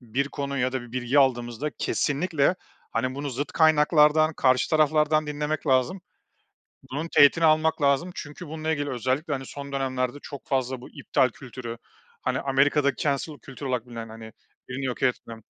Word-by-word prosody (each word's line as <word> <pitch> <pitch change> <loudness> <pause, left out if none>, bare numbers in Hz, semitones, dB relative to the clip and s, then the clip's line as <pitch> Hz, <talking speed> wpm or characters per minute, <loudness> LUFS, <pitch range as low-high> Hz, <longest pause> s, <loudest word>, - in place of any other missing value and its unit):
bir 130 +4 -2
konu 140 -1 -4
ya 125 0 0
da 130 -2 -2
bir 120 -1 -13
bilgi 130 +2 +1
aldığımızda 125 +1 +1
kesinlikle, 155 +2 +1 0.4
hani, 130 +3 -1
bunu 140 0 -4
zıt 140 +4 -4
kaynaklardan 155 0 +4
karşı 130 -2 +2
taraflardan 155 0 +3
dinlemek 150 +1 -3
lazım. 135 +8 +2 0.9
Bunun 150 +5 -3
teğetini 145 +3 +6
almak 155 0 +3
lazım 140 +6 +2
çünkü 150 +4 -8
bununla 160 +1 -3
ilgili 145 -1 -2
özellikle, 130 +5 -1
hani, 135 -1 -4
son 140 0 -8
dönemlerde 130 -1 -1
çok 140 -2 -9
fazla 130 -1 -1
bu - - -11
iptal 130 - +1
kültürü, 120 -1 -8 0.4
hani, - - -1
Amerika'da 140 +1 +2
cancel 145 +1 -2
kültürü 135 0 -8
olarak 125 -2 -1
bilinen, 115 -2 -7
hani, 110 -1 -10 0.4
birini 135 +2 -4
yok 125 -2 -3
etme. 120 -2 -1
140 Hz, 165 wpm, -25 LUFS, 130-150 Hz, 0.9 s, teğetini